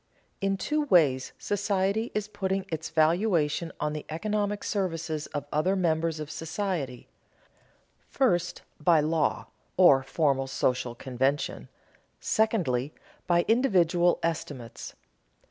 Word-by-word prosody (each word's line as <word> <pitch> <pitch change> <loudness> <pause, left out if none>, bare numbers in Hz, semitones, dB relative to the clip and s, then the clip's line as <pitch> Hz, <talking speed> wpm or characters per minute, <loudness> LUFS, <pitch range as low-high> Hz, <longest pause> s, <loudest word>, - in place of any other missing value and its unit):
_ - - -45 0.4
In 195 0 +1
two 300 +8 -1
ways 145 - +3
society 205 +2 0
is 210 -1 -1
putting 195 -2 -2
its 160 0 -4
valuation 165 0 +1
on 150 0 -1
the 150 - -5
economic 205 +4 -2
services 165 -6 -2
of 145 -1 -5
other 180 +6 +2
members 165 -3 0
of 150 0 -6
society: 160 - -4 1.0
first, 180 -11 0 0.2
by 160 +1 +4
law, 155 +1 0 0.3
or 175 -8 +7
formal 135 -1 0
social 125 -2 -1
convention; 130 +3 -2 0.5
secondly, 175 - 0 0.3
by 175 -1 +3
individual 180 -8 +3
estimates. 145 -8 -4
165 Hz, 110 wpm, -27 LUFS, 150-195 Hz, 1.0 s, or